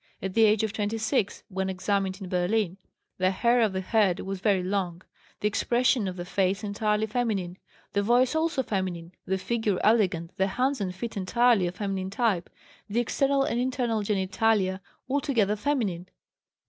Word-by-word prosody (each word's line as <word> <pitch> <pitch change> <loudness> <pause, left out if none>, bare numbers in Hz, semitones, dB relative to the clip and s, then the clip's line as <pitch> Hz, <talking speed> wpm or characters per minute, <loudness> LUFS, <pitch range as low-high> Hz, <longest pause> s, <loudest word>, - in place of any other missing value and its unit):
At 190 -1 -4
the 225 +1 +5
age 215 0 +3
of 220 -1 -1
26, 220 +1 -1
when 190 -1 -2
examined 190 0 -1
in 190 - -5
Berlin, 180 +1 0 0.4
the 185 0 +3
hair 235 +5 +2
of 220 -3 +3
the 190 0 -2
head 195 -2 +2
was 195 0 -4
very 195 -2 +2
long, 185 -2 -2 0.4
the 210 - +2
expression 240 +1 +1
of 185 - -4
the 175 -1 -6
face 195 +2 0
entirely 210 +1 0
feminine, 210 -6 -2 0.3
the 200 - +2
voice 245 +5 +3
also 315 -4 0
feminine, 185 -6 -3 0.2
the 190 +1 +1
figure 220 -2 -1
elegant, 185 -7 +2
the 190 - +2
hands 255 +5 0
and 185 -2 -3
feet 225 +2 -5
entirely 215 0 +3
of 175 - -5
feminine 195 -2 -3
type, 200 -4 0 0.4
the 220 +4 0
external 275 +3 +1
and 240 -3 -1
internal 245 -3 0
genitalia 195 -1 +1 0.3
altogether 260 -7 +1
feminine. 205 -8 -1
205 Hz, 165 wpm, -27 LUFS, 190-230 Hz, 0.4 s, the